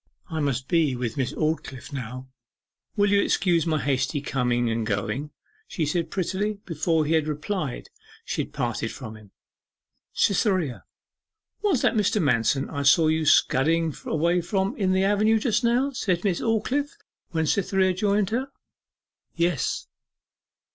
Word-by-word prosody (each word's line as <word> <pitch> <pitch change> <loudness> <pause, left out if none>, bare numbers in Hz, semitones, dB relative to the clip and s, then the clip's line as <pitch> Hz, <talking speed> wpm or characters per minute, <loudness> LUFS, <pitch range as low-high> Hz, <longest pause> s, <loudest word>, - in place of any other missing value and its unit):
'I 160 - -2
must 135 -3 -1
be 160 -6 +2
with 120 -2 -3
Miss 130 -3 -1
Aldclyffe 155 -3 -3
now 130 0 -6 0.7
will 205 -1 +2
you 200 0 +4
excuse 175 -5 +1
my 155 -2 +1
hasty 140 +2 0
coming 125 -4 0
and 115 0 -1
going?' 110 +7 -2 0.4
she 160 - -2
said 165 +3 -1
prettily. 195 +3 -1
Before 160 -1 0
he 155 - 0
had 160 -1 +2
replied 150 -1 -4 0.3
she - - -2
had - - -7
parted - - -2
from 110 0 -8
him. 105 -2 -15 0.8
'Cytherea, 185 - +1 0.8
was 380 - +1
it - - +3
Mr. 210 -1 +1
Manston 135 - +2
I 140 - -3
saw 155 +3 +5
you 160 0 +1
scudding 160 +3 +3
away 170 +3 +1
from 190 +2 -1
in 190 -3 0
the 190 0 +2
avenue 210 +3 +3
just 220 +1 0
now?' 245 +4 +2
said 185 -9 -1
Miss 190 -5 0
Aldclyffe, 255 +6 -1 0.3
when 160 -3 0
Cytherea 190 +2 +2
joined 200 +1 +1
her. 260 +4 -2 0.8
'Yes. 170 -5 0
165 Hz, 150 wpm, -25 LUFS, 140-200 Hz, 0.8 s, saw